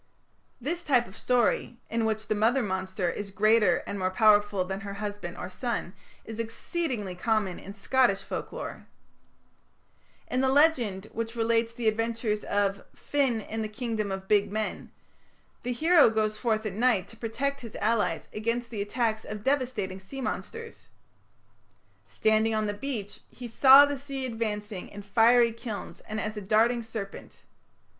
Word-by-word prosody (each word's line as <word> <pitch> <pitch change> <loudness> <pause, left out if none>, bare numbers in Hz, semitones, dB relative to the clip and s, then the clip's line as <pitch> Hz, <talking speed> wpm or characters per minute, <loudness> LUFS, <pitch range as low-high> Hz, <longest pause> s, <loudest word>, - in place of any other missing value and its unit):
This 335 +8 -3
type 250 -6 +3
of 190 - -13
story, 245 0 +1
in 230 0 0
which 220 0 -1
the - - +1
mother 230 +5 +2
monster 190 -1 -2
is 200 +4 -3
greater 210 -1 +3
and 200 - -4
more 185 0 +1
powerful 205 -1 +4
than 190 +1 -4
her 200 0 -6
husband 205 -4 -5
or - - -5
son, 190 -1 -3 0.3
is 225 0 -7
exceedingly 230 - -3
common 205 0 0
in 195 - -9
Scottish 205 0 +2
folklore. - - -6 1.4
In 255 - -1
the 265 - +3
legend 260 -9 +3
which 230 0 -4
relates 230 0 +1
the 230 -1 -3
adventures 225 -1 0
of 200 -1 0
"Finn 270 -6 0
in 220 +2 -4
the 215 - -2
Kingdom 215 -2 -3
of 190 0 -5
Big 205 -1 +3
Men", 215 0 -3 0.7
the 250 - -3
hero 320 +3 +5
goes 215 -1 0
forth 220 -1 0
at 210 - -2
night 220 -3 +2
to 225 - -13
protect 260 +5 -3
his 230 -3 -9
allies 220 0 0
against 230 +2 -2
the 215 -3 -3
attacks 220 +1 -1
of 210 -1 -7
devastating 255 -9 -1
sea 190 +9 -9
monsters. 455 - -6 1.2
Standing 220 0 +2
on 215 0 +1
the 205 - -1
beach, 205 -3 -5
"he 245 - -8
saw 265 +4 +8
the 285 -1 -3
sea 275 -1 -5
advancing 210 -4 -4
in 205 0 -9
fiery 230 +3 +5
kilns 225 -2 -7
and 215 +1 -3
as 215 0 -3
a 210 - -5
darting 225 +4 +3
serpent.... 220 -3 -8
220 Hz, 160 wpm, -28 LUFS, 205-240 Hz, 1.4 s, saw